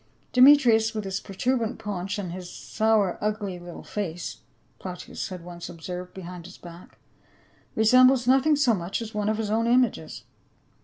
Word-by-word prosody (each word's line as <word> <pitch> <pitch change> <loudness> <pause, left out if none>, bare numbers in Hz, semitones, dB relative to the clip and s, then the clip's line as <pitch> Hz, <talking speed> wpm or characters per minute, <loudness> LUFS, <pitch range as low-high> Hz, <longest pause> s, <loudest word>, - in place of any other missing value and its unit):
" - - -39
Demetrius, 250 -5 +6
with 215 - -2
his 195 -1 -3
protuberant 230 +3 -2
paunch 195 -2 -4
and 190 -4 -4
his 180 0 -7
sour 220 -4 0
ugly 210 -4 -2
little 175 -1 -10
face 175 -5 -5
" - - -40
— - - -39
Plautius 180 +3 -6
had 180 -2 -8
once 175 0 -8
observed 180 +2 -7
behind 180 -2 -9
his 185 - -13
back 170 0 -13 0.3
— - - -33
" - - -35
resembles 255 +3 +5
nothing 270 +4 +4
so 275 -5 +3
much 180 -2 -3
as 220 - -9
one 210 0 -1
of 215 - 0
his 215 -2 -3
own 225 +1 +1
images." 245 +1 +1
210 Hz, 185 wpm, -25 LUFS, 180-230 Hz, 0.3 s, Demetrius